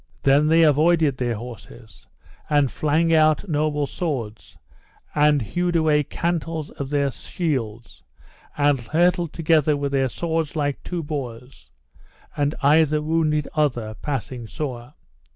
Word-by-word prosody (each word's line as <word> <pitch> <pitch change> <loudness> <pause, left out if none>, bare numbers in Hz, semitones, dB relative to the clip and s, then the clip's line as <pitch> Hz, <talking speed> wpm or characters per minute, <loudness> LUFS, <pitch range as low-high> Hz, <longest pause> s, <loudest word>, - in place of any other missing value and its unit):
Then 140 +2 +4
they 165 +1 +5
avoided 155 -1 +3
their 120 -2 -1
horses, 115 0 -11 0.4
and 145 -3 +2
flang 160 +2 +1
out 155 +4 +3
noble 150 -2 0
swords, 130 -9 -5 0.6
and 150 -2 +3
hewed 175 - -1
away 155 -2 +3
cantels 165 0 -3
of 140 -1 -6
their 140 -1 +1
shields, 120 - -4 0.6
and 145 -2 +3
hurtled 170 - +1
together 155 -2 +2
with 140 -1 -2
their 135 -1 +1
shields 165 +1 -2
like 145 -2 -1
two 175 -2 -4
boars, 130 -4 -7 0.7
and 145 +1 0
either 155 +1 +4
wounded 155 -1 0
other 120 -8 0
passing 125 -2 -5
sore. 125 -1 -6
150 Hz, 125 wpm, -23 LUFS, 130-160 Hz, 0.7 s, they